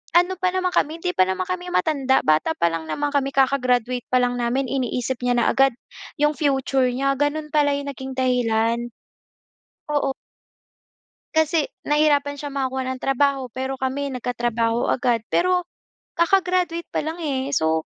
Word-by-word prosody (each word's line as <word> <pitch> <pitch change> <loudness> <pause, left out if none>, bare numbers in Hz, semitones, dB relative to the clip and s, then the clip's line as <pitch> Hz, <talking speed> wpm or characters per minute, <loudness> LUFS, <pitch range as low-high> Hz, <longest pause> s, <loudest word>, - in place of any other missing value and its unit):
ano 355 +2 +4
pa 370 - +2
naman 370 -1 0
kami, 315 0 +1
'di 360 0 0
pa - - +5
naman 190 - -1
kami 360 -1 -4
matanda, 275 -6 +2
bata 155 - +3
pa - - +3
lang 165 -1 -4
naman 290 - -1
kami. 275 -1 +1
Kaka-graduate 250 -2 +2
pa 255 - +4
lang 245 0 +1
namin, 250 +3 0
iniisip 255 -1 -2
niya 245 0 +2
na 235 - +2
agad 270 0 +4 0.5
'yong 295 0 +4
future 270 -3 +1
niya. 275 +2 +1
Gano'n 300 +1 -1
pala 290 -1 +3
'yong 285 0 -4
naging 265 0 -7
dahilan. 235 -3 +1 1.1
Oo. 280 -2 +1 1.2
Kasi 315 0 +3 0.2
nahirapan 295 -1 +2
siya 285 0 -6
makakuha 265 -1 -2
ng 260 - -4
trabaho, 270 0 +1
pero 265 +1 -3
kami 270 +2 -2
nagkatrabaho 240 -2 -1
agad. 240 -3 +1
Pero 360 +1 +2 0.6
kaka-graduate 360 -1 +1
pa - - -1
lang 320 +2 -4
eh. 275 -2 -2
So, 160 -3 +1
270 Hz, 155 wpm, -22 LUFS, 250-300 Hz, 1.2 s, pa